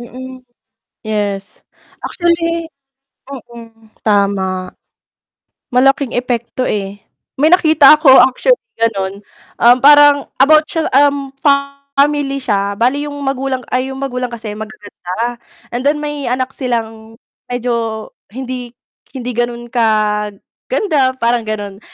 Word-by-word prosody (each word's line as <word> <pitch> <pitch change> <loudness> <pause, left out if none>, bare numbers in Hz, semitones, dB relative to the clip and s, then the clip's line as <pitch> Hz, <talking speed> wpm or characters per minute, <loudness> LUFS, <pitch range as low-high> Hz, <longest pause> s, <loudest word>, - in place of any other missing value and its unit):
Mm, 255 +2 -9 0.6
yes, 205 -2 -3 0.4
actually 335 -1 -1 0.5
mm, 230 -4 -12 0.2
tama. 195 -3 0 1.0
Malaking 270 +1 +2
epekto 245 0 -2
eh. 200 -1 -3 0.4
May 310 +5 +4
nakita 310 -5 +6
ako 265 -4 +7
actually - - +2 0.2
ganon, 200 -3 -1 0.4
um, 240 +1 +7
parang 290 0 +6 0.2
about 310 +2 +5
siya, 325 -1 -1
um, 280 0 +3 0.7
family 280 -1 +2
siya 200 -4 -1
bale 255 +6 +1
yung - - -8
magulang 270 -1 -2
ay 255 +1 0
yung - - -8
magulang 250 -2 -3
kasi 225 -3 -7
magaganda, 215 +1 -6 0.4
and 240 - -2
then 295 +1 +2
may 295 -2 -4
anak 255 +1 -1
silang 225 -3 -4 0.4
medyo 235 -3 -2 0.2
hindi 250 +1 -6 0.4
hindi 250 -2 -5
ganun 240 0 -2
kaganda 220 - -1
parang 235 -1 0
ganon. 205 -2 -5
245 Hz, 110 wpm, -15 LUFS, 220-275 Hz, 1.0 s, ako